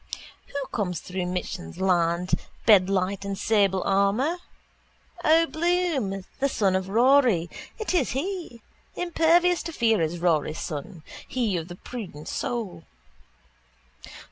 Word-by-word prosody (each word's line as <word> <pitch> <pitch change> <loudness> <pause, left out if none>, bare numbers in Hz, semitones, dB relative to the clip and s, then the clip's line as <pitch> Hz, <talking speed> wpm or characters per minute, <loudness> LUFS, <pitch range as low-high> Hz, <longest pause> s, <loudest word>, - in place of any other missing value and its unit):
Who 280 -1 -4
comes 180 -6 -1
through 180 -1 -4
Michan's 180 - -5
land, 175 -1 +1 0.3
bedight 195 -1 +3
in 200 0 -3
sable 195 -3 +2
armour? 200 - +2 0.9
O'Bloom, 320 - +1
the 275 +1 +2
son 195 -7 +1
of 190 0 -2
Rory: 235 -6 +4 0.3
it 430 -6 -3
is 325 -9 +2
he. 325 - -4 0.3
Impervious 345 0 +3
to 335 - -5
fear 225 - +2
is 160 +2 -1
Rory's 160 -3 0
son: 155 +3 -6 0.2
he 235 -7 -1
of 165 -1 -3
the 175 - -8
prudent 185 -9 -8
soul. 195 -9 -3
200 Hz, 115 wpm, -25 LUFS, 180-280 Hz, 0.9 s, Rory